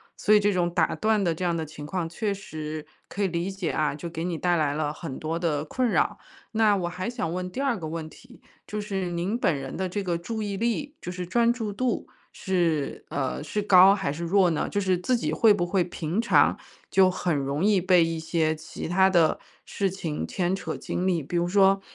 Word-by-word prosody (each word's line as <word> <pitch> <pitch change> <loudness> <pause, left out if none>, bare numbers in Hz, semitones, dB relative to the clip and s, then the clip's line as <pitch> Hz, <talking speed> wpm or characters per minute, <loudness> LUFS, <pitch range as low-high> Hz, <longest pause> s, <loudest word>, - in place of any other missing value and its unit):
所 215 - +2
以 210 - +7
这 205 -1 +2
种 175 -1 0
打 175 - +2
断 215 -1 +1
的 170 -4 +1
这 185 - -5
样 170 -1 +1
的 160 -1 -2
情 150 -1 -9
况 170 +1 -2
确 200 +4 -2
实 155 -5 -6 0.2
可 205 - -5
以 - - +3
理 175 +2 -2
解 190 -4 -3
啊， 150 -2 0
就 160 +4 -6
给 165 0 -5
你 175 -2 -2
带 175 +1 +1
来 150 -3 +1
了 150 0 -1
很 150 -6 -7
多 160 +2 -2
的 155 -3 -1
困 250 +8 0
扰。 - - +1 0.4
那 215 -2 +4
我 175 -2 -2
还 185 +6 -4
想 200 -9 -3
问 180 0 -4
第 260 - -6
二 270 -5 +1
个 160 -3 -5
问 160 0 -5
题， - - -17 0.3
就 210 - -4
是 195 -3 -3
您 180 +7 -1
本 170 - +2
人 135 -1 -6
的 185 -1 -2
这 205 +2 -2
个 175 -3 -1
注 220 +6 -5
意 200 -1 -3
力， 235 +7 -2
就 180 - -5
是 180 0 -5
专 235 +6 +3
注 220 -4 -3
度， 250 +2 -1 0.2
是， 170 -7 -1
呃， 140 +1 -2
是 210 +8 -2
高 195 -1 +7
还 190 -8 -1
是 170 +3 -6
弱 185 +1 +3
呢？ 155 - -1
就 205 - -1
是 190 -2 +1
自 240 +8 +1
己 - - -2
会 225 -3 +5
不 175 -4 0
会 180 0 +1
平 175 +4 -2
常 235 - +4 0.3
就 190 -1 +5
很 175 -3 -1
容 140 +6 -1
易 205 -4 +4
被 180 -2 +5
一 165 0 -2
些 160 -1 0
其 155 +1 -7
他 190 +2 +4
的 170 -4 +3 0.3
事 195 -1 -1
情 165 -5 -4
牵 185 0 -1
扯 - - -5
精 180 - -3
力。 175 -4 +1
比 155 +6 -6
如 170 - +2
说， 195 +1 +4
180 Hz, 250 characters per minute, -26 LUFS, 165-200 Hz, 0.4 s, 以